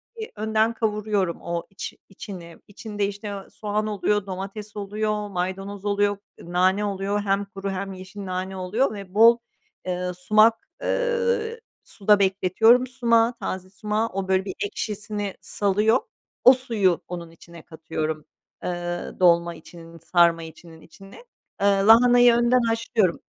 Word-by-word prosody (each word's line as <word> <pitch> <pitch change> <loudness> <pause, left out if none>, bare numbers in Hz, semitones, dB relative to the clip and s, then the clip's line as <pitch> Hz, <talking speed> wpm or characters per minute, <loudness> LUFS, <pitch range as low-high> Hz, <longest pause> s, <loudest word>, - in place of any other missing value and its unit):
bir 440 -1 -7
önden 220 +1 +1
kavuruyorum 210 -5 -1
o 170 0 -4
iç 195 - -7 0.2
içini. 180 -3 -10
İçinde, 205 0 -4
işte, 205 +1 -7
eee, 200 -1 -7
soğan 210 0 -3
oluyor, 205 -1 0
domates 200 +3 -7
oluyor, 210 +1 -2
maydanoz 195 +2 -4
oluyor, 205 0 +1 0.3
nane 185 +4 +1
oluyor, 200 +1 -1
hem 200 0 0
kuru 195 -1 -6
hem 195 +1 -4
yeşil 190 +2 -9
nane 185 +1 -4
oluyor 210 +8 0
ve 195 -3 -9
bol, 230 +3 +7 0.5
eee, 180 0 -2
sumak 215 +5 +3 0.2
eee, 470 -2 0 0.2
suda 205 0 +2
bekletiyorum 200 +6 +4
sumağı, 235 -2 +2
taze 185 -5 -5
sumağı. 210 +4 -2
O, 195 0 -3
böyle, 190 0 +1
bir 190 - -4
ekşisini 205 -1 -4
salıyor. 210 +3 +2 0.4
O 255 - +9
suyu 210 -9 0
onun 170 -2 -7
içine 170 0 -14
katıyorum, 155 -1 -5 0.4
eee, 175 0 -4
dolma 170 -1 +4
içinin, 165 0 -13
sarma 170 0 +3
içinin 160 0 -13
içine. 195 +5 -15 0.4
Eee, - - +2
lahanayı 235 +5 +6
önden 240 +1 +3
haşlıyorum 225 -5 0
200 Hz, 135 wpm, -24 LUFS, 185-215 Hz, 0.5 s, O